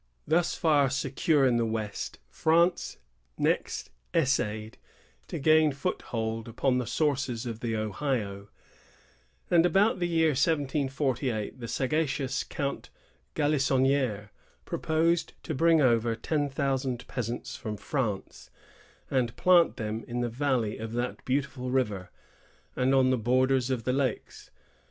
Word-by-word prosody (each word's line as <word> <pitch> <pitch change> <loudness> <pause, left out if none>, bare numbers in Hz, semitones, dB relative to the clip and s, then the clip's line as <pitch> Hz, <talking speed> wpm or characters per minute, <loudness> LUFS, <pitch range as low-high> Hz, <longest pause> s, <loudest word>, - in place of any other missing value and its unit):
Thus 165 +3 +2
far 145 -5 +3
secure 140 +2 +1
in 125 -2 +3
the 120 - +2
west, 110 -2 -4
France 170 +3 +2 0.4
next - - -1 0.2
essayed 110 -8 0 0.5
to - - -4
gain 155 +1 +4
foothold 115 -7 -3
upon 125 +2 0
the 125 - -3
sources 135 -6 0
of 115 -2 -5
the 115 -2 -2
Ohio; 110 -2 -2 1.0
and 170 -2 +6
about 195 +3 +3
the 175 - 0
year 165 -2 +3
1748, 135 -5 0
the 120 - -6
sagacious 135 0 -1
Count 140 -1 -4 0.5
Galissonnière 135 -6 +1 0.4
proposed 165 +2 0
to 160 - -3
bring 165 +2 +4
over 115 -3 +3
ten 145 +5 -1
thousand 135 -2 -2
peasants 125 +2 -4
from 110 -5 -5
France, 110 -6 -3 0.6
and 125 -3 0
plant 180 -2 +4
them 110 +1 -3
in 120 0 -2
the 120 - -1
valley 125 -3 -1
of 110 0 -5
that 120 +1 -3
beautiful 130 -1 -2
river, 105 -8 -1 0.7
and 130 +2 +2
on 130 -1 +4
the 130 - +1
borders 130 +2 +2
of 125 -3 -1
the 125 - 0
lakes. 130 -4 -2
130 Hz, 130 wpm, -28 LUFS, 115-145 Hz, 1.0 s, and